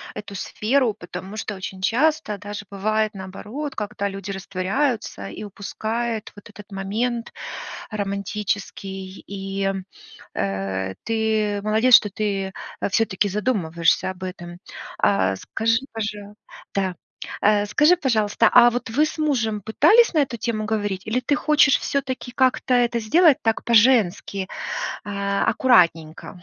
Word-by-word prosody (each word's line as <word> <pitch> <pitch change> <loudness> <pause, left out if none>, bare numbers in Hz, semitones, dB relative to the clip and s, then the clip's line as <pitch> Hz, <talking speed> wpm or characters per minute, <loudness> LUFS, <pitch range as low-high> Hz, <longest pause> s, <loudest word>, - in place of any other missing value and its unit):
эту 205 -1 -7
сферу, 230 +4 0
потому 185 0 -8
что 220 -1 -4
очень 190 0 -7
часто 245 -1 +1
даже 205 +1 -7
бывает 215 +2 0
наоборот, 210 +9 -6
когда 205 -1 -3
люди 195 0 -6
растворяются 195 - -2
и 155 - -8
упускают 220 +3 -4
вот 205 - -14
этот 210 0 -13
момент 230 +5 -2 0.6
романтический, 200 -1 -4
и, 195 0 -5
м, 195 -1 -2 0.5
э, 95 -1 -2
ты 220 -2 0
молодец, 220 +4 +4
что 210 -3 +7
ты, 195 -1 -2 0.3
э, - - 0
всё-таки 210 -1 +1
задумываешься 185 -6 +1
об 185 0 -10
этом. 175 -2 -7 0.4
А 100 - +2
скажи, 225 - 0
пожа 210 -2 -5 0.4
Да, 190 -2 0 0.5
а 205 0 +3
скажи, 300 - +4
пожалуйста, 220 -9 +2
а 240 - +8
вот 245 0 -3
вы 300 +7 +3
с 315 - -6
мужем 235 -9 0
пытались 355 - +5
на 310 - +4
эту 260 -4 -1
тему 220 -1 -2
говорить, 205 -3 -2
или 225 +3 0
ты 285 +3 +1
хочешь 300 -2 +4
всё-таки, 265 -2 -3
как-то 255 0 +2
это 240 -1 +2
сделать, 310 +7 +5
так 225 -1 0
по-женски, 210 -5 +3 0.6
а, 200 -1 -1
аккуратненько? 170 -7 +2
210 Hz, 130 wpm, -23 LUFS, 195-235 Hz, 0.6 s, а